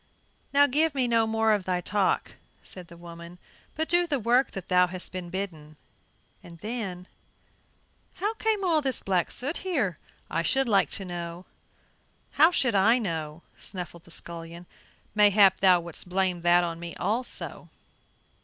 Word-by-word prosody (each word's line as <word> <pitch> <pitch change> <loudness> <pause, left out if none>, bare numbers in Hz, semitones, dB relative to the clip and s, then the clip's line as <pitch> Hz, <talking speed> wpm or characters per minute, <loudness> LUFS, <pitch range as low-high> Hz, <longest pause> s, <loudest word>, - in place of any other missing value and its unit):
"Now 285 +1 +6
give 295 +2 +1
me 255 -2 +1
no 230 -1 +2
more 220 0 +2
of 200 -3 -1
thy 180 -1 0
talk," 195 +2 0 0.3
said 180 -2 -9
the 170 - -14
woman, 170 0 -11 0.4
"but 315 +1 -1
do 350 0 +2
the 290 -4 0
work 245 +4 +3
that 195 - -7
thou 180 0 +4
hast 185 0 -5
been 180 -1 -6
bidden." 170 -5 -6 0.7
Then 185 0 -6 1.1
"How 410 +4 -1
came 440 -2 -1
all 330 -4 +2
this 265 -3 +1
black 185 -3 +1
soot 280 +6 -2
here, 255 - -1 0.3
I - - -1
should 265 +10 +2
like 200 -4 +3
to 195 - -7
know?" 175 0 -6 0.9
"How 315 +3 +6
should 260 -9 +1
I 210 +5 +5
know?" 165 -7 -4 0.2
snuffled 175 -3 -7
the - - -17
scullion, 170 +1 -8 0.5
"mayhap 205 -2 +5
thou 185 -2 +5
wouldst 170 +1 -6
blame 185 -1 0
that 175 +1 +4
on 165 -1 -4
me 170 0 -7
also?" 240 +4 -3
190 Hz, 155 wpm, -27 LUFS, 175-245 Hz, 1.1 s, Now